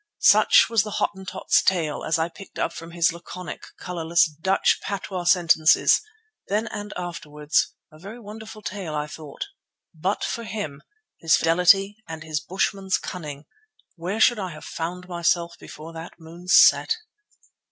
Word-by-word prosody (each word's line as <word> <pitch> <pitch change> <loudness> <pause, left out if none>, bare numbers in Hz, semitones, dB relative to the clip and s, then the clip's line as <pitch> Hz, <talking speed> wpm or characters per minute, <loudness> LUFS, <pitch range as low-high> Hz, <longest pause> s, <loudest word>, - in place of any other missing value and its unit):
Such - - +6
was 230 -3 +3
the 215 - -5
Hottentot's 190 -1 0
tale 165 -5 0
as 160 - +1
I 160 0 0
picked 180 +3 -13
it - - -2
up - - -1
from 165 - -9
his 170 -1 +2
laconic, 175 +1 -8
colourless, 170 -1 +1
Dutch 160 +6 +1
patois 190 -2 -4
sentences, 170 -3 +5 0.5
then 210 +3 0
and 205 0 -6
afterwards; 150 -4 -2 0.2
a 155 - -16
very 205 +7 -9
wonderful 215 0 -10
tale 185 -7 -5
I 150 0 -1
thought. 150 - -8 0.5
But 185 +6 -2
for 235 - -3
him, 205 -11 -5 0.4
his 165 -1 +4
fidelity 180 +5 +4
and 160 -1 -7
his 155 -1 -2
bushman's 190 +2 -1
cunning, 150 -5 -7 0.5
where 180 +6 -4
should 235 0 +5
I 190 -2 -3
have 155 - -11
found 180 +2 -5
myself 170 -1 0
before 160 +2 -10
that 165 +1 -8
moon 170 +2 -12
set? 450 - +6
175 Hz, 150 wpm, -24 LUFS, 160-195 Hz, 0.5 s, Such